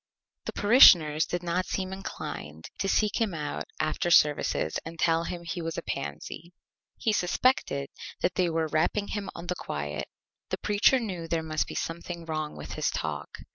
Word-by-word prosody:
The - - -4
Parishioners 170 - +7
did 175 0 -3
not 175 +2 -1
seem 190 0 -2
inclined 80 - -7
to 195 - 0
seek 210 +3 +1
him 205 -6 0
out 150 -2 -4
after 155 +2 0
Services 150 - +3
and 165 +1 -8
tell 165 +1 +2
him 175 0 -5
he 170 +1 -4
was 165 0 -4
a - - -3
Pansy. 75 - -6 0.4
He 220 - +1
suspected 180 - +1 0.3
that 180 - +1
they 180 -2 +1
were 165 -1 0
Rapping 165 +7 0
him 205 -2 -3
on 170 - -7
the 180 - -1
Quiet. 75 - -4 0.4
The - - -1
Preacher 210 +5 +3
knew 185 -8 -4
there 165 -1 -1
must 155 0 -1
be - - -7
something 170 0 -4
wrong 155 -2 -3
with - - -7
his - - 0
Talk. - - -3
170 Hz, 175 wpm, -28 LUFS, 155-190 Hz, 0.4 s, Parishioners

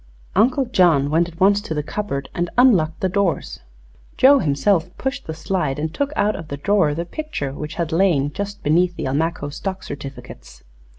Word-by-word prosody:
Uncle 250 +7 +3
John 165 - +3
went 170 +2 +2
at 165 0 -13
once 200 +1 +4
to 160 -7 -5
the 150 - -1
cupboard 145 -6 -4
and 175 0 -2
unlocked 185 -11 +4
the 190 - +2
doors. 185 -2 -1 0.6
Joe 275 +2 +6
himself 160 - +1
pushed 265 +1 -4
the 160 - -3
slide 160 -4 -2
and 155 +2 -3
took 285 +6 -1
out 210 +1 +1
of 165 - -8
the 140 - -5
drawer 170 -2 +2
the 170 +2 -3
picture, 240 - -5
which 150 +2 -6
had 170 -1 -2
lain 160 -5 +2
just 200 0 -5
beneath 175 +4 +2
the - - -4
Almaquo 145 +2 -1
stock 190 +5 -5
certificates. 135 -3 -9
170 Hz, 185 wpm, -21 LUFS, 150-200 Hz, 0.6 s, Joe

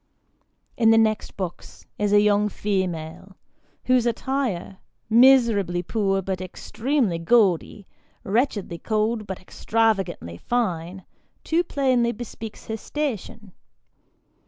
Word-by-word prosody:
In 225 -2 +4
the 225 - +6
next 220 -1 +1
box, 185 -3 -7
is 205 -1 +1
a 205 - +6
young 210 0 +3
female, 185 -2 -3 0.5
whose 250 -2 +3
attire, 235 -6 -2 0.3
miserably 230 -8 +5
poor, 195 -1 0
but 185 0 -3
extremely 220 - -1
gaudy, 195 0 +2 0.4
wretchedly 205 -5 -1
cold 215 +1 -1
but 190 -1 -5
extravagantly 195 - -1
fine, 185 - -2 0.4
too 335 +2 +1
plainly 255 -7 +1
bespeaks 225 -1 -8
her 220 - -4
station. 225 -7 -5
210 Hz, 105 wpm, -24 LUFS, 190-235 Hz, 0.5 s, the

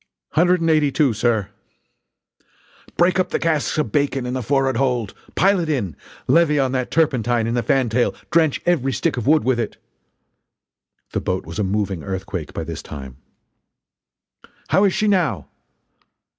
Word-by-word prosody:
"Hundred 175 +2 +3
and 165 - +1
eighty 150 -2 +3
two, 140 -4 +2
sir!" 110 -2 0 1.5
"Break 180 +1 +3
up 180 -1 +1
the - - 0
casks 160 -3 0
of 150 -9 -1
bacon 135 -1 0
in 125 - -3
the 130 - -2
forrard 135 +2 +1
hold! 125 -6 0 0.2
Pile 195 0 +3
it 165 -2 -2
in! 105 - -1 0.3
Levy 165 -3 +4
on 135 -2 +1
that 130 -1 -2
turpentine 125 -7 +1
in 115 - -1
the 120 - +1
fantail 125 -2 +1 0.2
drench 160 -3 +3
every 140 -7 +1
stick 125 - 0
of 120 -1 -4
wood 155 +1 +4
with 130 -2 +1
it!" 110 -3 -3 1.3
The - - -2
boat - - -2
was 85 +6 -7
a - - +2
moving 95 -2 -1
earthquake 95 -3 -5
by - - -4
this - - -6
time: 65 -3 -9 1.5
"How 200 - +4
is 195 - +2
she 215 - +1
now?" 185 -7 +1
130 Hz, 165 wpm, -21 LUFS, 115-160 Hz, 1.5 s, Levy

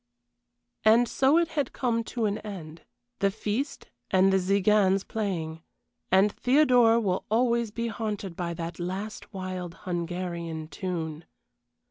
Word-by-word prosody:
And 230 +3 +6
so 270 +6 +3
it 340 -1 +2
had 285 -5 -2
come 235 -3 0
to 230 -1 -2
an 205 0 0
end 165 -6 -8 0.4
the 200 - +3
feast 220 +7 -3 0.2
and 190 0 +4
the - - +5
Tziganes 195 0 +3
playing, 165 -7 -3 0.5
and 195 +3 +5
Theodora 245 -4 +4
will 190 -4 0
always 235 0 +2
be 230 +3 -3
haunted 210 -5 -4
by 170 -1 -3
that 165 0 -5
last 190 +5 -5
wild 185 -3 -5
Hungarian 170 -2 -3
tune. 165 -4 -4
195 Hz, 130 wpm, -27 LUFS, 175-230 Hz, 0.5 s, And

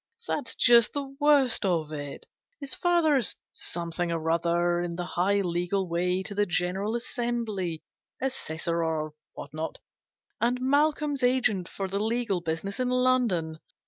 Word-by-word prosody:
" 465 - -21
That's 245 -6 -2
just 235 -2 +6
the 275 -1 -4
worst 285 -6 +4
of 165 -5 0
it. 145 -2 -6 0.3
His 280 -2 -4
father's 315 - +2 0.2
something 170 0 -2
or 165 -1 -1
other 175 +1 +1
in 175 -1 -3
the 175 0 -3
high 195 +3 +1
legal 180 +1 -1
way 180 +2 0
to 200 - -5
the 205 0 +1
General 185 +5 -1
Assembly 230 -8 -2 0.4
Assessor, 170 -10 -2
or 155 -2 -2 0.2
what 140 - -9
not 160 +1 -4 0.6
and 245 +2 +1
Malcolm's 290 +1 +1
agent 245 -8 +2
for 195 - -4
the 195 +1 -2
legal 220 -3 0
business 170 +6 -3
in 250 -1 +1
London. 245 -11 +1
195 Hz, 145 wpm, -27 LUFS, 170-250 Hz, 0.6 s, just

